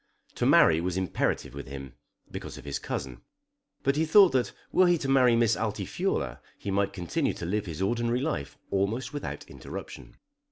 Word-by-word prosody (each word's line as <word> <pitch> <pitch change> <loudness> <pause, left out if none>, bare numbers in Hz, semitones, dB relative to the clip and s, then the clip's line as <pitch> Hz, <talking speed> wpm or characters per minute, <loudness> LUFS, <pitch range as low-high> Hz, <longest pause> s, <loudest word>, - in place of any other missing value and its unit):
To - - 0
marry 80 0 +6
was 90 +1 -2
imperative 95 -6 -1
with 70 0 -7
him, 70 -1 -8 0.4
because - - -7
of - - -11
his 70 - -3
cousin. 65 -3 -5 0.6
But 140 +1 +2
he 160 - +3
thought 190 +3 +7
that 130 -2 +1 0.2
were 185 - +5
he 175 -1 +4
to 140 - -4
marry 130 -3 +5
Miss 115 -1 +3
Altifiorla 110 -2 -2 0.2
he 100 - -4
might 100 +1 +1
continue 90 -4 -1
to - - -5
live 100 +3 -1
his 85 +2 -3
ordinary 120 +3 +1
life 135 - -3
almost 110 +7 -1
without 145 - -5
interruption. - - -9
105 Hz, 175 wpm, -28 LUFS, 85-130 Hz, 0.6 s, thought